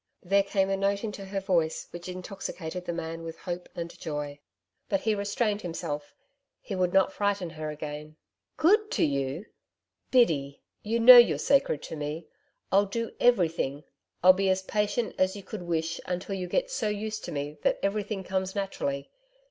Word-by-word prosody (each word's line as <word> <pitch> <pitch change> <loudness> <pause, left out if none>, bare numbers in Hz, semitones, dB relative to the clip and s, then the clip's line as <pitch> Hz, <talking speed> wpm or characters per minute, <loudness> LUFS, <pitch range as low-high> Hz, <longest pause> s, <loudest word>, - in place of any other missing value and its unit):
There 195 +2 +4
came 195 -1 0
a 195 - +1
note 200 +1 0
into 210 -3 -5
her 195 0 -3
voice 170 -4 0
which 175 +1 -8
intoxicated 180 -2 -6
the - - -2
man 165 -1 -5
with 165 0 -7
hope 175 -1 -6
and 170 0 -5
joy. 145 -2 -4 0.5
But 195 -1 +1
he 220 - +1
restrained 205 +1 0
himself. 165 - -5 0.4
He 205 - -7
would 180 -2 +1
not 195 0 +3
frighten 200 -4 -1
her 155 -1 -5
again. 150 0 -7 0.4
'Good 420 +6 +4
to - - +3
you! 140 +5 -2 0.6
Biddy 150 - +3 0.2
you 225 +2 -1
know 245 +2 +11
you're 240 - +7
sacred 275 - +2
to - - -6
me 150 +2 -4 0.5
I'll 200 +1 +4
do 230 +3 -3
everything 165 - +2 0.4
I'll 185 +1 +9
be 195 +1 +1
as 190 0 +1
patient 210 +3 -1
as 185 +1 +2
you 200 - -8
could 200 +1 -7
wish 165 -2 -2
until 180 +2 -3
you 185 -2 -3
get - - 0
so - - -1
used 215 +1 -3
to - - -6
me 145 +1 -4
that - - +2
everything 200 0 -1
comes 190 0 -2
naturally. 140 -8 -3
185 Hz, 175 wpm, -28 LUFS, 160-205 Hz, 0.6 s, know